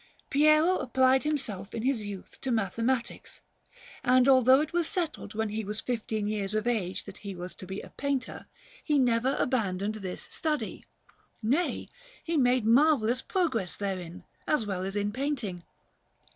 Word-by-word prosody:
Piero 305 +5 +5
applied 260 +2 +3
himself 220 -10 -3
in 225 - -3
his 255 -4 +1
youth 200 -2 -8
to 265 - -3
mathematics, 230 +3 -1 0.6
and 255 +1 +5
although 260 0 +7
it 310 +3 -2
was 345 -2 +1
settled 315 - -3
when 220 0 0
he 215 +1 -3
was 210 +2 -4
fifteen 220 -3 -2
years 205 -1 -2
of 215 +1 0
age 210 -7 -1
that 200 -1 -10
he 200 -2 -6
was 180 +1 -7
to 185 - -10
be 190 +2 -5
a - - -12
painter, 280 -2 -3 0.4
he 300 -2 +2
never 250 +1 +2
abandoned 210 -6 0
this 185 -2 -5
study; 305 -2 -2 0.6
nay, 280 +11 0 0.4
he 335 - -2
made 250 -4 +3
marvellous 250 -1 +4
progress 260 - -1
therein, 185 -4 -4 0.2
as 300 -8 +2
well 190 -3 -2
as 195 +1 -4
in 205 0 0
painting. 240 -8 -3
235 Hz, 160 wpm, -29 LUFS, 205-275 Hz, 0.6 s, although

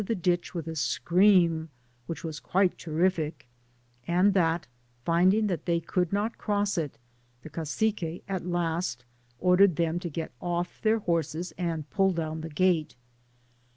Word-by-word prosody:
the 225 +3 -1
ditch 175 0 -1
with 165 -2 -4
a 160 - -4
scream 170 0 +3 0.4
which 165 - -5
was 160 -2 -5
quite 190 -1 +1
terrific, 160 -4 -1 0.6
but 175 -2 +3 0.4
finding 185 +6 +4
that 180 -6 -2
they 170 -1 +2
could 180 0 -1
not 210 +3 -1
cross 205 -1 0
it, 155 -6 -3 0.5
the 155 - -10
Cacique 170 +1 -2
at 190 -2 -3
last 170 -6 -2 0.3
ordered 180 +1 +5
them 165 +2 0
to 175 -1 -5
get 160 +1 -5
off 175 0 -3
their 220 0 +3
horses 170 -3 -1
and 165 -4 -3
pull 195 -2 +3
down 160 -1 -3
the 160 - -6
gate. 160 -1 +1
175 Hz, 145 wpm, -28 LUFS, 160-185 Hz, 0.6 s, ordered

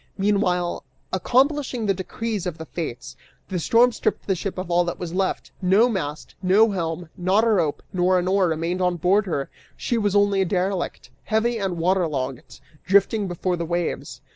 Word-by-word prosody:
Meanwhile, 190 -3 +1 0.3
accomplishing 260 - +1
the 200 - +2
decrees 200 +1 -4
of 170 -3 -4
the 160 - -7
Fates, 155 -7 -6 0.3
the 185 -2 -2
storm 235 +8 +4
stripped - - -2
the 195 - +1
ship 185 +2 -4
of 185 -1 -4
all 175 +1 +4
that 175 - -3
was 175 -2 -6
left; 190 +1 -1
no 195 +6 +4
mast, 155 -9 -4
no 205 +4 +4
helm, 170 -2 -3
not 185 +5 +2
a - - +2
rope 170 -9 +1
nor 185 0 +3
an 180 0 0
oar 190 -1 +3
remained 165 +3 -1
on 180 -1 +2
board 195 +5 +2
her; 140 -6 -2 0.3
she 235 - -1
was 205 -2 0
only 200 -1 +3
a - - +2
derelict, 185 0 -2
heavy 225 +1 +1
and 190 -3 -2
water 180 +1 +2
logged, 130 -4 -5 0.2
drifting 200 +2 +3
before 180 +1 -1
the 170 - -2
waves. 170 0 -3
185 Hz, 185 wpm, -23 LUFS, 175-205 Hz, 0.3 s, storm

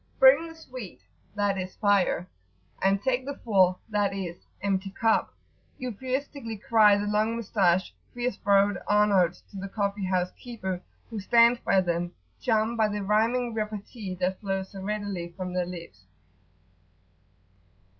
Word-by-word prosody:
"Bring 280 +5 +7
the 325 - -11
sweet" 255 - -9 0.4
(i.e. 200 -2 +1
fire), 200 -4 +2 0.5
"and 195 +1 +2
take 260 -1 +1
the 280 +1 -5
full,"[FN#19] 200 0 +2
(i.e., 190 -4 -4 0.3
empty 195 -1 0
cup), 225 +3 +1 0.5
euphuistically 255 0 -4
cry 210 -1 +5
the 205 - -2
long 215 +2 +1
moustached, 190 -5 +1 0.2
fierce 245 -2 -2
browed 200 -1 +3
Arnauts 200 -4 +3
to 200 - -9
the 195 +1 -5
coffee 200 -1 -1
house 185 -1 0
keeper, 190 -7 -5 0.3
who 220 - -4
stands 235 +4 +5
by 190 - +3
them 175 -1 -2 0.3
charmed 225 0 +1
by 220 -1 +4
the 210 -1 -3
rhyming 230 +4 +1
repartee 215 -2 -4
that 185 +1 -1
flows 195 -2 -3
so 195 - -8
readily 195 -4 -3
from 185 -1 -4
their 180 -1 0
lips. 170 - -9
205 Hz, 135 wpm, -27 LUFS, 190-225 Hz, 0.5 s, Bring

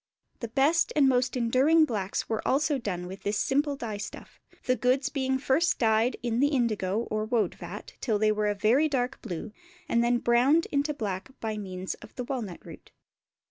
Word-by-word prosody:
The 235 - -4
best 285 +8 +2
and 285 -3 +5
most 255 0 +1
enduring 265 +7 +4
blacks 205 -8 -2 0.2
also 295 +3 +1
were 275 - 0
done 180 -6 -4
with 190 +2 -8
this 205 +1 -1
simple 285 +4 +1
dye 225 -6 -5
stuff, 205 - -9 0.2
the 255 - +2
goods 260 +3 +1
being 265 -2 0
first 280 +5 +1
dyed 225 +1 +2
in 235 -1 0
the 285 - +4
indigo 225 -7 0
or 215 0 0
woad 225 0 0
vat - - -9
till 220 -5 +1
they 215 +1 +3
were 210 0 0
a 205 - 0
very 245 +10 +3
dark 255 -3 -1
blue 205 0 -6 0.4
and 235 -5 +2
then 240 0 +3
browned 250 +8 +3
into 290 +1 0
black 200 -4 -4
by 220 -1 -3
means 185 -2 -5
of - - -14
the 250 - -4
walnut 240 -8 -5
root. - - -12
240 Hz, 190 wpm, -28 LUFS, 215-275 Hz, 0.4 s, and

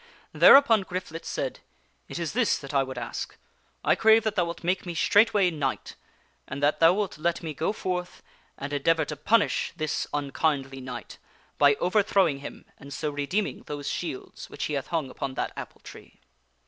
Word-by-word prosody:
Thereupon 255 -7 +7
Griflet 180 -3 -6
said, - - -3 0.3
" - - -41
It - - -5
is 170 -2 -3
this 245 0 +2
that 140 0 -9
I 140 - +4
would 130 -1 -5
ask 120 -1 -5 0.5
I - - +4
crave 220 0 +5
that 220 -2 0
thou 180 -4 +1
wilt 170 0 -7
make 180 +2 0
me 175 -2 -6
straightway 205 0 +4
knight, 135 - -3 0.5
and 140 +2 -6
that 145 - +2
thou 165 0 +7
wilt 195 -5 -3
let 170 +2 -1
me 160 -2 -4
go 160 +6 -1
forth 180 -3 -4 0.3
and 140 +1 -6
endeavor 160 +2 +2
to 150 - -5
punish 205 +10 +1
this 155 -1 -2
unkindly 140 -2 -1
knight, 130 0 -8 0.4
by 145 -1 +6
overthrowing 185 -4 +2
him, 140 - -9
and 140 - -12
so 150 +2 -3
redeeming 145 +9 -2
those 145 -1 -5
shields 150 -7 -6
which 145 - -6
he 150 - -2
hath 140 -2 -2
hung 160 -6 -2
upon 135 -1 -5
that - - -3
apple - - -9
tree." - - -14
160 Hz, 185 wpm, -26 LUFS, 140-185 Hz, 0.5 s, Thereupon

